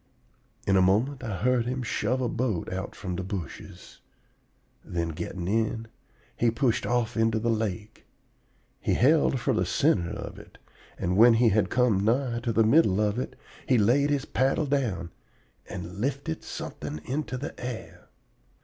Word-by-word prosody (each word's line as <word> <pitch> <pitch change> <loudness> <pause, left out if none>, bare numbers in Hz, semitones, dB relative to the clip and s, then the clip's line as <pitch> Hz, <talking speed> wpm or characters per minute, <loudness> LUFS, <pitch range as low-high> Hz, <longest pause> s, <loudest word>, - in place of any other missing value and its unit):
In 100 - +3
a 95 - +5
moment 120 +9 +2
I 105 -7 -4
heard 125 -2 +2
him 125 +1 -2
shove 120 +2 -1
a 125 - +1
boat 115 -8 -2
out 95 +2 -5
from 90 -2 -4
the 95 - -3
bushes; 95 -5 -7 0.8
then, 85 -1 -2
getting 85 +3 -5
in, 110 +2 0 0.5
he 120 - +2
pushed 115 0 0
off 120 -2 0
into 115 -1 +2
the 115 +1 +1
lake. 110 -1 -3 0.8
He - - 0
held 140 0 +4
for - - 0
the - - +1
center 85 -1 +2
of - - -7
it; - - -15 0.4
and 90 +2 -1
when 115 +1 +8
he 115 0 +4
had 100 -2 +2
come 115 -6 +2
nigh 120 +2 +1
to 120 0 -2
the 115 0 +4
middle 110 - +4
of 105 +2 +1
it, - - -4 0.3
he 130 - +4
laid 125 +7 +3
his 145 -1 0
paddle 135 +4 +1
down, 120 -11 -1 0.6
and 90 +2 -7
lifted 135 - -2
something 75 +1 -6
into 135 -1 -3
the 135 - -5
air. 125 -2 -7
115 Hz, 165 wpm, -27 LUFS, 95-125 Hz, 0.8 s, when